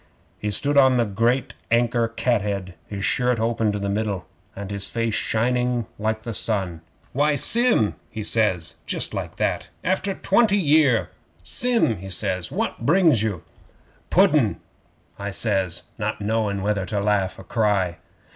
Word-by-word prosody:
'He 105 Hz, -, -2 dB
stood 140 Hz, +7 st, 0 dB
on 130 Hz, -2 st, +6 dB
the 120 Hz, -, +2 dB
great 115 Hz, +5 st, 0 dB, 0.2 s
anchor 120 Hz, 0 st, +2 dB
cathead, 105 Hz, -5 st, -1 dB
his 100 Hz, -2 st, -4 dB
shirt 125 Hz, -2 st, +1 dB
open 115 Hz, -1 st, 0 dB
to 105 Hz, -, -3 dB
the 100 Hz, 0 st, -3 dB
middle, 100 Hz, -3 st, -2 dB, 0.3 s
and 100 Hz, 0 st, -7 dB
his 100 Hz, 0 st, -1 dB
face 115 Hz, 0 st, -2 dB
shining 125 Hz, +2 st, 0 dB
like 110 Hz, +1 st, -2 dB
the 115 Hz, -, -5 dB
sun. 95 Hz, -7 st, -1 dB, 0.3 s
'"Why, 145 Hz, +2 st, +2 dB
Sim!" 230 Hz, -, +5 dB, 0.2 s
he 110 Hz, -, -6 dB
says. 100 Hz, -7 st, +1 dB
Just -, -, -2 dB
like -, -, -5 dB
that -, -, -2 dB, 0.2 s
after 190 Hz, +1 st, 0 dB
twenty 205 Hz, 0 st, +3 dB
year! 140 Hz, -, +3 dB, 0.3 s
"Sim," 230 Hz, -, +1 dB
he 95 Hz, +2 st, -9 dB
says, 95 Hz, -2 st, -2 dB
"what -, -, -3 dB
brings 160 Hz, -, +4 dB
you?" 105 Hz, -7 st, -2 dB, 0.7 s
'"Pudden," -, -, +3 dB, 0.6 s
I 100 Hz, 0 st, -4 dB
says, 95 Hz, -4 st, -1 dB, 0.2 s
not 105 Hz, +1 st, -2 dB
knowing 105 Hz, -2 st, -1 dB
whether 100 Hz, -2 st, -1 dB
to 105 Hz, -3 st, -1 dB
laugh 100 Hz, -2 st, 0 dB
or -, -, -10 dB
cry. 100 Hz, -7 st, 0 dB
110 Hz, 150 wpm, -23 LUFS, 100-125 Hz, 0.7 s, on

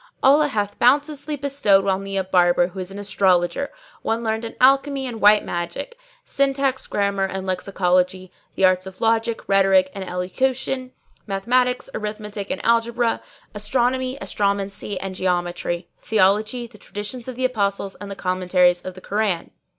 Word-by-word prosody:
"Allah 295 Hz, +3 st, +6 dB
hath 205 Hz, -6 st, -3 dB
bounteously 290 Hz, +3 st, +2 dB
bestowed 270 Hz, -9 st, +2 dB
on 195 Hz, 0 st, 0 dB
thee 195 Hz, 0 st, -4 dB
a 190 Hz, -, +1 dB
Barber 175 Hz, -1 st, +3 dB
who 190 Hz, +1 st, -9 dB
is 185 Hz, 0 st, -5 dB
an 195 Hz, -, -9 dB
astrologer, 195 Hz, +3 st, +1 dB, 0.3 s
one 225 Hz, +1 st, -1 dB
learned 220 Hz, 0 st, -1 dB
in 230 Hz, -, -6 dB
alchemy 275 Hz, +1 st, +3 dB
and 235 Hz, -3 st, -5 dB
white 210 Hz, +1 st, +6 dB
magic;[FN#612] 175 Hz, -, -4 dB, 0.3 s
syntax, 275 Hz, -1 st, 0 dB
grammar, 200 Hz, -1 st, 0 dB
and 190 Hz, 0 st, -5 dB
lexicology; 185 Hz, -1 st, 0 dB, 0.2 s
the 190 Hz, -, +3 dB
arts 185 Hz, 0 st, +2 dB
of 190 Hz, -, -10 dB
logic, 225 Hz, 0 st, 0 dB
rhetoric 195 Hz, -1 st, +4 dB
and 195 Hz, -, -5 dB
elocution; 255 Hz, +8 st, -2 dB, 0.4 s
mathematics, 245 Hz, +6 st, +1 dB
arithmetic 210 Hz, -1 st, -5 dB
and -, -, -4 dB
algebra; 235 Hz, 0 st, +2 dB, 0.3 s
astronomy, 255 Hz, +5 st, 0 dB
astromancy 200 Hz, 0 st, -2 dB
and 195 Hz, 0 st, -4 dB
geometry; 175 Hz, -1 st, -2 dB
theology, 215 Hz, +3 st, +1 dB
the 225 Hz, -3 st, -15 dB
Traditions 210 Hz, +5 st, -6 dB
of 255 Hz, -, -5 dB
the 255 Hz, +1 st, -1 dB
Apostle 200 Hz, -5 st, -1 dB
and 205 Hz, -, -7 dB
the 200 Hz, -, -5 dB
Commentaries 180 Hz, -1 st, +2 dB
on 185 Hz, -, -6 dB
the 185 Hz, -, -13 dB
Koran. 200 Hz, -4 st, -1 dB
205 Hz, 150 wpm, -22 LUFS, 190-245 Hz, 0.4 s, Allah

